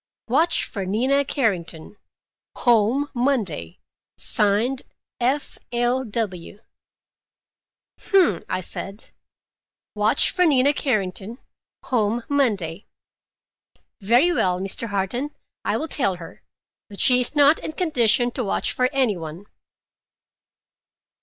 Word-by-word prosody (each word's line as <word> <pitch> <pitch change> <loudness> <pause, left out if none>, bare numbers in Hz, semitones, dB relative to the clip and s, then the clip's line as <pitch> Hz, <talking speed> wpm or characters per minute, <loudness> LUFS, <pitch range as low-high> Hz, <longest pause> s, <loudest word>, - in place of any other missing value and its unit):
"'Watch 335 +2 +2
for 200 - -5
Nina 255 +9 +1
Carrington. 195 - -3 0.6
Home 240 +4 +2
Monday. 220 - -1 0.4
Signed 215 +6 +1 0.4
F. 265 +4 -1
L. 240 +2 +1
W.'" 205 -4 -4 1.5
"Hum!" 360 - +3
I 185 - -1
said. 195 +3 -6 0.8
"'Watch 210 +1 +2
for 360 - +1
Nina 285 -3 +4
Carrington. 215 -4 -2 0.5
Home 230 -1 0
Monday.' 205 - 0 1.1
Very 245 - +3
well, 180 - +1
Mr. 195 +4 -4
Harton, 210 +8 -3 0.3
I - - 0
will 320 - -3
tell 220 - +2
her, 170 -2 -12 0.5
but 200 - -11
she 250 -1 +5
is 250 - +3
not 290 +2 +5
in 315 - -6
condition 245 - +2
to 250 - -3
watch 200 - 0
for 250 0 +1
any 255 -8 +1
one." 165 +3 -8
235 Hz, 105 wpm, -22 LUFS, 195-270 Hz, 1.5 s, she